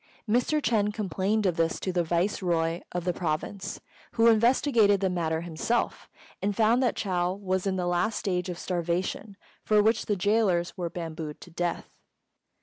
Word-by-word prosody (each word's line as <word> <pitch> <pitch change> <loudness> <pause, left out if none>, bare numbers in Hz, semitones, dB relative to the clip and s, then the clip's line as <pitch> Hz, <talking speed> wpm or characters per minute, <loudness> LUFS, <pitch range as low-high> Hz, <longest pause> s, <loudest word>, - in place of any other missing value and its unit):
Mr. 245 +7 +2
Ch'êng 215 -7 +1
complained 205 +1 -1
of 180 -2 +1
this 165 0 +1
to 185 - -3
the 175 -1 +2
Viceroy 170 -1 0
of 175 -1 -3
the 180 - +1
province, 170 +4 -3 0.3
who 230 -1 +3
investigated 230 -2 +4
the 190 -1 0
matter 160 -2 -1
himself, 175 +8 -2 0.3
and 200 +1 -1
found 230 +4 +3
that 250 - +1
Chou 180 -2 0
was 190 -1 -2
in 190 - 0
the 180 -1 -1
last 175 +5 0
stage 180 -2 -1
of 175 - -4
starvation, 180 +3 -2 0.3
for 210 -1 +4
which 220 +1 +2
the 205 - +1
gaolers 195 -3 +1
were 175 -3 -3
bambooed 160 -3 -6
to 175 - -12
death. 175 +1 -3
185 Hz, 165 wpm, -27 LUFS, 175-210 Hz, 0.3 s, investigated